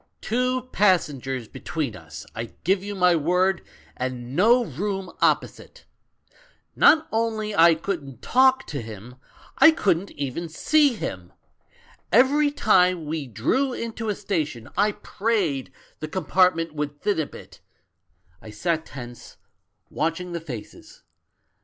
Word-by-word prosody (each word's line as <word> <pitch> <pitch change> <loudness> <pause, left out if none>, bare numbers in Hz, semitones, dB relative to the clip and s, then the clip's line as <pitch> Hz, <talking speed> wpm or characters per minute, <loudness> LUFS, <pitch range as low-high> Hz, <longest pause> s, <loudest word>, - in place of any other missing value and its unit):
"Two 250 +2 -1
passengers 140 - +1
between 145 -5 -4
us, 80 -3 -10
I 115 0 -6
give 190 +2 +1
you 205 0 -5
my 180 -2 +4
word, 180 +4 +1 0.3
and 125 0 -5
no 235 +7 +4
room 190 - -4
opposite. - - -1 0.9
Not 315 0 +5
only 220 -2 -1
I 165 -2 +6
couldn't 155 - -5
talk 260 +1 +4
to 140 -3 -4
him 110 +3 -10 0.2
— - - -23
I 320 - +9
couldn't 195 - +1
even 145 +4 -4
see 290 - +3
him. 90 - -6 0.8
Every 275 +7 +4
time 185 - +3
we 150 -2 -4
drew 250 - 0
into 230 -2 -4
a 205 - 0
station 160 - -3
I 205 +2 +2
prayed 200 - -2 0.3
the 155 - -5
com 180 +1 -4
partment 165 -2 +2
would 145 -1 -4
thin 205 0 0
a 155 - -1
bit; - - -14 0.8
I 110 - -11
sat 160 +9 -2
tense, 120 -2 -10 0.5
watching 165 +3 -2
the 170 -1 -4
faces. 125 -9 -10
175 Hz, 135 wpm, -24 LUFS, 140-210 Hz, 0.9 s, I